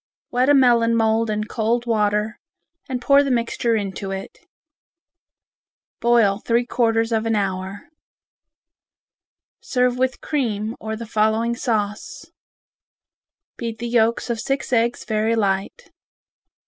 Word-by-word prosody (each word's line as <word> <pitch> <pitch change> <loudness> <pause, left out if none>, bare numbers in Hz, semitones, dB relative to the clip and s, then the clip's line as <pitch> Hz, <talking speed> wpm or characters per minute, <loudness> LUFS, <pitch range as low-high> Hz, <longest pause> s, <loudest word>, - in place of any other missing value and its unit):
Wet 250 +2 +2
a 290 - +6
melon 235 -3 +4
mould 225 0 +2
in 215 0 -1
cold 230 +2 -1
water 210 -1 0 0.5
and 255 -1 -2
pour 280 +3 +5
the 280 - -1
mixture 235 -1 0
into 195 -1 -4
it. 195 - -6 1.6
Boil 230 -4 +3
three 235 +2 +1
quarters 225 -2 +1
of 225 0 0
an 225 - +1
hour. 195 -1 -3 1.7
Serve 250 -1 0
with 260 0 0
cream, 225 -6 -2
or 220 0 -4
the 230 +1 -7
following 220 +2 +1
sauce: 210 -4 -3 1.3
Beat 230 -2 -4
the 235 +1 -4
yolks 230 0 +1
of 230 - -3
six 270 +2 -2
eggs 235 0 +1
very 220 +1 0
light. 200 - -2
230 Hz, 120 wpm, -21 LUFS, 215-240 Hz, 1.7 s, a